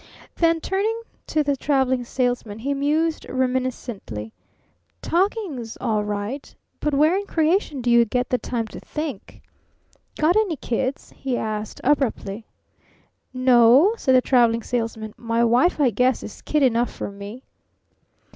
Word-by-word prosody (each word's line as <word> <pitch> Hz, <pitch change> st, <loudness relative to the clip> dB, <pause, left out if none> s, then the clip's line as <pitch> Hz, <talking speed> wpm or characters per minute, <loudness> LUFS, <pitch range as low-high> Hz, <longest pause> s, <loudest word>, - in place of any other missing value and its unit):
Then, 330 Hz, -1 st, +2 dB
turning 410 Hz, +6 st, -1 dB, 0.3 s
to 310 Hz, -1 st, +1 dB
the 285 Hz, -1 st, +1 dB
Traveling 265 Hz, -2 st, +1 dB
Salesman, 245 Hz, -4 st, -1 dB
he 270 Hz, +5 st, -2 dB
mused 305 Hz, +3 st, 0 dB
reminiscently: 250 Hz, -, -3 dB, 0.7 s
"Talking's 345 Hz, -, -1 dB
all 215 Hz, -2 st, 0 dB
right. 210 Hz, +6 st, -4 dB, 0.2 s
But 300 Hz, -2 st, 0 dB
where 305 Hz, +5 st, +4 dB
in 400 Hz, +1 st, -2 dB
creation 320 Hz, -3 st, +1 dB
do 240 Hz, -, +2 dB
you 235 Hz, 0 st, +6 dB
get 250 Hz, +3 st, -1 dB
the 250 Hz, -, 0 dB
time 235 Hz, -2 st, -3 dB
to -, -, -9 dB
think? 300 Hz, -9 st, -6 dB, 0.7 s
Got 315 Hz, +4 st, +3 dB
any 425 Hz, -6 st, +2 dB
kids?" 260 Hz, +1 st, -3 dB
he 260 Hz, -3 st, -2 dB
asked 215 Hz, -1 st, -4 dB
abruptly. 235 Hz, -6 st, 0 dB, 0.9 s
"N 255 Hz, 0 st, -4 dB
o," 250 Hz, -, +7 dB
said 260 Hz, -, +2 dB
the 255 Hz, -, +6 dB
Traveling 235 Hz, -3 st, +3 dB
Salesman. 225 Hz, -3 st, -3 dB
"My 230 Hz, 0 st, 0 dB
wife, 245 Hz, +10 st, +3 dB
I 270 Hz, -5 st, +4 dB
guess, 250 Hz, +4 st, +1 dB
is -, -, -9 dB
kid 300 Hz, -2 st, +1 dB
enough 240 Hz, -2 st, +2 dB
for -, -, -6 dB
me." 200 Hz, +6 st, -9 dB
255 Hz, 145 wpm, -23 LUFS, 230-300 Hz, 0.9 s, o